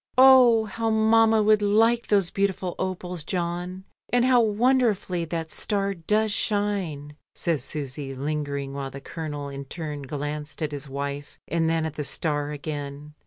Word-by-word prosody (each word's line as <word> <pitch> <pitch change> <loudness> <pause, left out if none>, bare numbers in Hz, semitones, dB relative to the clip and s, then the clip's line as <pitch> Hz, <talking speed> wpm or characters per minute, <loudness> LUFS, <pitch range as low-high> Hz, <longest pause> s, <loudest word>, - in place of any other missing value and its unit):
"Oh! 255 -4 +7
how 225 +1 -2
mamma 220 0 +4
would 215 0 +4
like 225 +3 +3
those 195 -4 +2
beautiful 195 -2 -1
opals, 180 -3 -4
John; 180 +2 -3 0.3
and 245 0 +3
how 255 -2 +5
wonderfully 215 -5 +2
that 165 0 -4
star 200 -1 -1
does 210 +5 0
shine," 195 -9 -1 0.2
says 160 -7 -1
Susy, 140 -1 -5
lingering, 140 -1 -3
while 140 -1 -4
the 135 - -8
Colonel 145 -1 -6
in 140 0 -7
turn 150 0 -6
glanced 150 +2 -5
at 150 - -1
his 145 -1 -6
wife 140 +1 -5
and 165 0 +1
then 165 -1 +1
at 160 - -4
the 150 - -2
star 145 0 -1
again. 145 0 -6
170 Hz, 155 wpm, -25 LUFS, 145-210 Hz, 0.3 s, Oh